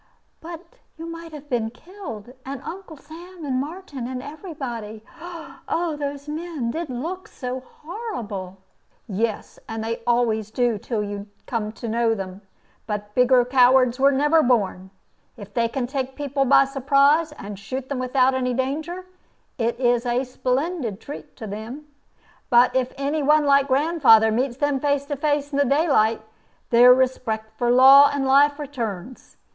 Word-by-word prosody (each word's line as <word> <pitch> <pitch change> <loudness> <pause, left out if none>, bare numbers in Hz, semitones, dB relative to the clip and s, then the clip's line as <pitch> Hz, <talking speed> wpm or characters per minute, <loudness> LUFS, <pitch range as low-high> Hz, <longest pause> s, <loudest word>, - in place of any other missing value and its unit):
"But 335 +1 -9 0.3
you 325 - -7
might 330 0 -8
have 300 -1 -10
been 235 -5 -1
killed, 250 - -10
and 270 0 -6
Uncle 340 -1 -8
Sam, 335 +4 -11
and 260 -2 0
Martin, 290 -5 -6
and 255 0 -5
every 310 +4 -9
body. 225 -5 -6 0.7
Oh, 335 -2 -1
those 285 0 -5
men 305 -6 -4
did 330 +3 -4
look 330 +10 -5
so 255 0 -5
horrible!" 245 - -7 0.5
"Yes, 215 +2 -3
they 225 +1 -4
always 230 -3 +1
do 235 -1 0
till 215 0 -3
you 205 0 -6 0.2
come 215 -3 -3
to 235 - -7
know 230 0 +1
them. 190 -1 -7 0.5
But 210 -1 -4
bigger 250 0 +4
cowards 250 0 +4
were 275 +1 +5
never 295 +4 +3
born. 200 -7 0 0.5
If 205 -2 -11
they 235 -1 +1
can 245 +2 -3
take 265 0 -4
people 280 -1 -1
by 275 +1 +6
surprise, 280 +4 +3
and 205 -8 -9
shoot 255 +6 -5
them 275 -2 -3
without 255 +1 +2
any 250 -1 -1
danger, 315 +8 -3 0.5
it 235 +1 -1
is 245 -1 +2
a 245 +2 +1
splendid 255 - -2
treat 285 - -10
to 220 - -8
them. 220 +8 -7 0.6
But 245 0 +5
if 255 -1 +1
any 285 +3 -1
one 300 +1 +4
like 280 -1 +4
grandfather 265 -6 +4
meets 245 +2 -1
them 290 -1 0
face 285 0 0
to 290 0 -3
face 290 0 -1
in 280 - -1
the - - +5
daylight, 270 -6 +2 0.5
their 245 +1 +8
respect 225 -4 0
for 240 +1 0
law 270 +3 +8
and 280 -1 -1
life 285 +2 +4
returns. 250 - -6
260 Hz, 160 wpm, -23 LUFS, 235-290 Hz, 0.7 s, their